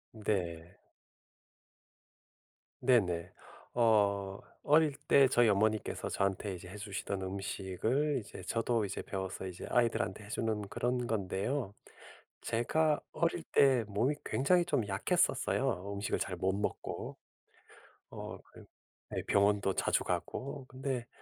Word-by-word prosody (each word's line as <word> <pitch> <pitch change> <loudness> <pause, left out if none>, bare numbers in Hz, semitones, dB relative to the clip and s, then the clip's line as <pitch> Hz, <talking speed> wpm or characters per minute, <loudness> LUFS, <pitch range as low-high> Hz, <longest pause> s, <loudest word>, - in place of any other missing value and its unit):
네. 90 -6 -2 2.0
네네. 95 -10 +2 0.4
어 100 -4 +3 0.2
어릴 150 -1 +4
때 135 -1 +7
저희 120 -2 +5
어머니께서 110 +2 +1
저한테 100 0 -1
이제 90 +1 -10
해주시던 100 -1 -4
음식을 100 +9 -1
이제 105 - -10
저도 115 -1 0
이제 100 - -4
배워서 95 -1 -4
이제 90 -1 -7
아이들한테 115 -4 +1
해주는 110 0 -1
그런 120 +4 -1
건데요. 100 +3 -1 0.7
제가 150 +6 +1
어릴 170 0 0
때 130 -4 +5
몸이 115 +8 +1
굉장히 175 +6 +3
좀 145 -10 +1
약했었어요. 100 -1 +1
음식을 100 +1 -1
잘 95 - -2
못 95 +2 +1
먹고. 100 +1 -3 0.9
어 - - -7
그 - - -13 0.5
네. - - -1
병원도 100 -1 +3
자주 - - +1
가고 140 0 -3
근데 130 -2 -3
105 Hz, 240 characters per minute, -33 LUFS, 95-125 Hz, 2.0 s, 때